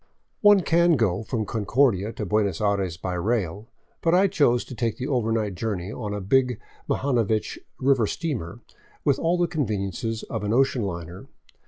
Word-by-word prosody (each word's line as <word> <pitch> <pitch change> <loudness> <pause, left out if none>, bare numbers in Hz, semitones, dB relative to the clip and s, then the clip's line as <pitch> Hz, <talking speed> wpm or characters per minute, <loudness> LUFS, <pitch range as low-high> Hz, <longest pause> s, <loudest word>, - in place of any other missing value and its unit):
One 205 -2 +7
can 170 0 +3
go 105 -9 +1
on 110 - -7
from 110 -2 -2
Concordia 110 -1 +1
to - - -4
Buenos 105 -5 0
Aires 100 -5 0
by 90 +1 -4
rail, 100 +1 -1 0.3
but 165 +1 +3
I 190 +2 +5
chose 145 -11 +2
to - - -9
take 115 -2 -2
the 130 - -4
overnight 115 -6 0
journey 95 0 -3
on 110 -3 -5
a 105 - -3
big 125 +4 +1 0.3
Mlhanovich 115 -6 0 0.2
river 130 -4 +3
steamer, 125 - -4 0.4
with 140 - +3
all 170 +2 +1
the 175 - +2
conveniences 110 - -2
of 110 -3 -5
an 105 +1 0
ocean 130 0 +2
liner. 85 -2 -6
115 Hz, 170 wpm, -25 LUFS, 100-135 Hz, 0.4 s, One